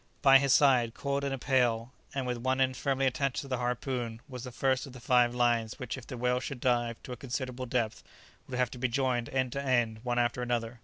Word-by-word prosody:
By 135 Hz, -1 st, +8 dB
his 140 Hz, -1 st, +1 dB
side, 125 Hz, -5 st, +4 dB
coiled 140 Hz, 0 st, -2 dB
in 140 Hz, -, -1 dB
a 135 Hz, -, -2 dB
pail, 125 Hz, -2 st, +1 dB, 0.2 s
and 135 Hz, -2 st, -1 dB
with 125 Hz, -1 st, -2 dB
one 130 Hz, +2 st, 0 dB
end 130 Hz, -1 st, +2 dB
firmly 135 Hz, 0 st, 0 dB
attached 130 Hz, 0 st, 0 dB
to 140 Hz, -, -9 dB
the 130 Hz, -2 st, -2 dB
harpoon, 125 Hz, -2 st, -2 dB
was 125 Hz, -3 st, -7 dB
the 125 Hz, -, -6 dB
first 130 Hz, +2 st, 0 dB
of 130 Hz, -, -11 dB
the 130 Hz, -, -10 dB
five 120 Hz, 0 st, +3 dB
lines 120 Hz, -3 st, +1 dB
which 125 Hz, -, -4 dB
if 130 Hz, -3 st, -10 dB
the 125 Hz, -, -6 dB
whale 125 Hz, +1 st, +1 dB
should 130 Hz, 0 st, -5 dB
dive 120 Hz, -2 st, +1 dB
to -, -, -8 dB
a -, -, -3 dB
considerable 130 Hz, 0 st, -4 dB
depth, 115 Hz, -3 st, -1 dB, 0.5 s
would 125 Hz, -, -4 dB
have 125 Hz, -2 st, +1 dB
to 125 Hz, -, -8 dB
be 130 Hz, -, +1 dB
joined 125 Hz, -1 st, 0 dB
end 130 Hz, -2 st, 0 dB
to 140 Hz, -, -3 dB
end, 120 Hz, -5 st, +1 dB
one 120 Hz, 0 st, -2 dB
after 120 Hz, 0 st, +1 dB
another. 120 Hz, -1 st, -2 dB
125 Hz, 245 wpm, -30 LUFS, 120-130 Hz, 0.5 s, By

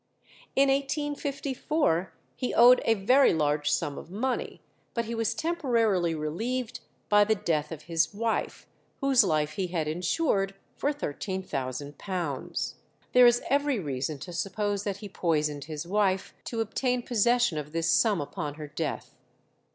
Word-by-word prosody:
In 275 Hz, 0 st, +4 dB
1854 280 Hz, -, -1 dB, 0.2 s
he 250 Hz, -, -3 dB
owed 245 Hz, +2 st, +7 dB
a 225 Hz, -, +4 dB
very 250 Hz, +3 st, +4 dB
large 150 Hz, -1 st, +1 dB
sum 145 Hz, -4 st, -1 dB
of -, -, -12 dB
money, 240 Hz, +7 st, -2 dB, 0.4 s
but 235 Hz, -1 st, 0 dB
he 230 Hz, -, -4 dB
was 225 Hz, -1 st, 0 dB
temporarily 230 Hz, -, +1 dB
relieved 220 Hz, +11 st, -3 dB, 0.3 s
by 210 Hz, 0 st, +6 dB
the 220 Hz, +1 st, +2 dB
death 155 Hz, -5 st, -1 dB
of 155 Hz, -2 st, -7 dB
his 165 Hz, -1 st, +1 dB
wife, 225 Hz, +2 st, -2 dB, 0.3 s
whose 270 Hz, -3 st, +5 dB
life 155 Hz, -5 st, +1 dB
he 190 Hz, 0 st, -2 dB
had 170 Hz, -3 st, -2 dB
insured 195 Hz, -, 0 dB, 0.2 s
for 290 Hz, -, 0 dB
£13,000. 145 Hz, -, -4 dB, 0.4 s
There 250 Hz, -1 st, +8 dB
is 240 Hz, 0 st, +3 dB
every 285 Hz, -1 st, +2 dB
reason 140 Hz, -2 st, -3 dB
to 175 Hz, +6 st, -8 dB
suppose 200 Hz, +3 st, -2 dB
that 200 Hz, -2 st, -2 dB
he 205 Hz, -, -8 dB
poisoned 150 Hz, -6 st, -1 dB
his 155 Hz, +1 st, -5 dB
wife 190 Hz, 0 st, 0 dB
to 230 Hz, -2 st, -2 dB
obtain 245 Hz, +3 st, -1 dB
possession 240 Hz, -6 st, +2 dB
of 150 Hz, 0 st, -7 dB
this 165 Hz, 0 st, -1 dB
sum 215 Hz, -5 st, +3 dB
upon 145 Hz, 0 st, -4 dB
her 150 Hz, -1 st, -8 dB
death. 150 Hz, -5 st, -4 dB
195 Hz, 145 wpm, -28 LUFS, 155-245 Hz, 0.4 s, There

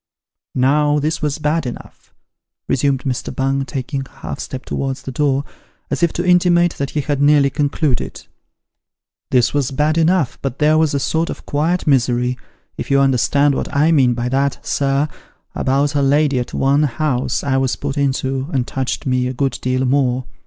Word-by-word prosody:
" -, -, -49 dB
Now 145 Hz, +3 st, +3 dB
this 155 Hz, +3 st, -1 dB
was 150 Hz, -2 st, -1 dB
bad 150 Hz, -1 st, 0 dB
enough," 120 Hz, -, -10 dB, 0.6 s
resumed 135 Hz, 0 st, +1 dB
Mr. 130 Hz, -3 st, -3 dB
Bung, 135 Hz, +1 st, -1 dB
taking 135 Hz, 0 st, -4 dB
a -, -, -25 dB
half -, -, -7 dB
step 130 Hz, 0 st, -6 dB
towards 135 Hz, 0 st, -3 dB
the 135 Hz, -, -5 dB
door, 140 Hz, +1 st, +1 dB, 0.5 s
as -, -, -1 dB
if 170 Hz, -2 st, +3 dB
to 175 Hz, -, -2 dB
intimate 175 Hz, -1 st, +4 dB
that 140 Hz, -1 st, -1 dB
he 150 Hz, -, -2 dB
had 145 Hz, -1 st, -2 dB
nearly 145 Hz, -1 st, +4 dB
concluded. 145 Hz, -2 st, -1 dB, 0.5 s
" -, -, -68 dB
This 125 Hz, -2 st, +2 dB
was 145 Hz, -3 st, 0 dB
bad 150 Hz, +4 st, +1 dB
enough, 165 Hz, -4 st, +1 dB
but 135 Hz, -1 st, -3 dB
there 155 Hz, +1 st, +3 dB
was 155 Hz, -3 st, +1 dB
a -, -, +1 dB
sort 160 Hz, +4 st, -1 dB
of -, -, -7 dB
quiet 160 Hz, +5 st, 0 dB
misery 125 Hz, -3 st, +2 dB, 0.4 s
if -, -, -5 dB
you 140 Hz, -, +4 dB
understand 140 Hz, +2 st, +3 dB
what -, -, -3 dB
I 150 Hz, +3 st, +3 dB
mean 130 Hz, -6 st, +3 dB
by 120 Hz, 0 st, -2 dB
that, 140 Hz, +1 st, -1 dB
sir 140 Hz, +1 st, +1 dB, 0.5 s
about 140 Hz, +2 st, 0 dB
a 145 Hz, -, +1 dB
lady 140 Hz, -1 st, +2 dB
at 125 Hz, -, -4 dB
one 140 Hz, +2 st, +2 dB
house 130 Hz, -2 st, -1 dB
I 135 Hz, -1 st, +1 dB
was 130 Hz, -1 st, 0 dB
put 140 Hz, -1 st, -4 dB
into, 135 Hz, -1 st, -1 dB
as 135 Hz, -, +1 dB
touched 130 Hz, 0 st, -3 dB
me 125 Hz, -1 st, +1 dB
a 130 Hz, -, -3 dB
good 130 Hz, -1 st, -1 dB
deal 130 Hz, +1 st, 0 dB
more. 130 Hz, -1 st, +1 dB
140 Hz, 190 wpm, -18 LUFS, 130-150 Hz, 0.6 s, intimate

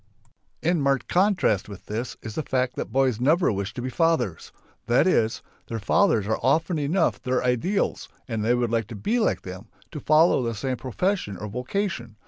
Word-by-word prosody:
In 170 Hz, -1 st, +2 dB
marked 135 Hz, -3 st, +1 dB
contrast 180 Hz, -, +2 dB
with 100 Hz, -2 st, -10 dB
this 115 Hz, +4 st, -4 dB
is 110 Hz, -, -6 dB
the 155 Hz, -, -2 dB
fact 130 Hz, -3 st, -1 dB
that -, -, -5 dB
boys 130 Hz, -4 st, +2 dB
never 155 Hz, +6 st, +3 dB
wish 100 Hz, -1 st, -3 dB
to 125 Hz, -, -5 dB
be 130 Hz, -, -2 dB
fathers. 145 Hz, -, 0 dB, 0.4 s
That 120 Hz, +6 st, +4 dB
is: 115 Hz, -12 st, +1 dB, 0.2 s
their 115 Hz, -, -4 dB
fathers 110 Hz, -, +2 dB
are 110 Hz, +1 st, -1 dB
often 160 Hz, +4 st, +1 dB
enough 160 Hz, +1 st, +1 dB
their 125 Hz, 0 st, 0 dB
ideals 125 Hz, -, 0 dB, 0.2 s
and 115 Hz, -4 st, -2 dB
they 120 Hz, +3 st, +3 dB
would 120 Hz, -2 st, 0 dB
like 115 Hz, -3 st, 0 dB
to 115 Hz, -, -8 dB
be 215 Hz, -, 0 dB
like 220 Hz, -, 0 dB
them, 95 Hz, +4 st, -8 dB, 0.2 s
to 150 Hz, -, -6 dB
follow 155 Hz, +1 st, +4 dB
the 115 Hz, -2 st, -2 dB
same 130 Hz, +4 st, -2 dB
profession 130 Hz, -, -2 dB
or 105 Hz, -, -6 dB
vocation. 125 Hz, -, -3 dB
125 Hz, 190 wpm, -25 LUFS, 110-160 Hz, 0.4 s, That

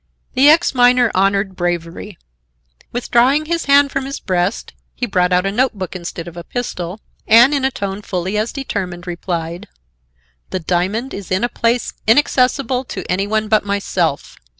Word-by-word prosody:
The 275 Hz, +3 st, +6 dB
ex 325 Hz, +1 st, +4 dB
miner 245 Hz, -2 st, +4 dB
honored 195 Hz, 0 st, +1 dB
bravery. 175 Hz, +2 st, -4 dB, 0.7 s
Withdrawing 250 Hz, +5 st, +2 dB
his 335 Hz, +1 st, -2 dB
hand 280 Hz, 0 st, +5 dB
from 275 Hz, -, -2 dB
his 275 Hz, +1 st, -5 dB
breast, 185 Hz, +2 st, -2 dB, 0.2 s
he 245 Hz, -, -2 dB
brought 180 Hz, -5 st, +1 dB
out 180 Hz, +1 st, +2 dB
a 195 Hz, -, 0 dB
note 255 Hz, +5 st, +1 dB
book 185 Hz, -1 st, -5 dB
instead 170 Hz, -1 st, -6 dB
of 170 Hz, -, -9 dB
a 170 Hz, -, -7 dB
pistol 195 Hz, -4 st, -5 dB, 0.3 s
and, 240 Hz, +6 st, +7 dB
in 280 Hz, -2 st, 0 dB
a 265 Hz, -, +3 dB
tone 200 Hz, -5 st, -5 dB
fully 185 Hz, 0 st, -3 dB
as 215 Hz, +2 st, 0 dB
determined, 185 Hz, -10 st, -5 dB
replied: 170 Hz, -1 st, -4 dB, 0.8 s
"The 185 Hz, -, -2 dB
diamond 185 Hz, -, -1 dB
is 195 Hz, -3 st, -7 dB
in 185 Hz, +3 st, 0 dB
a 240 Hz, -, +1 dB
place 235 Hz, +1 st, 0 dB
inaccessible 255 Hz, +1 st, +2 dB
to 190 Hz, -6 st, -6 dB
any 195 Hz, +2 st, 0 dB
one 215 Hz, +1 st, 0 dB
but 215 Hz, 0 st, +3 dB
myself. 195 Hz, -6 st, -2 dB
205 Hz, 170 wpm, -18 LUFS, 180-250 Hz, 0.8 s, and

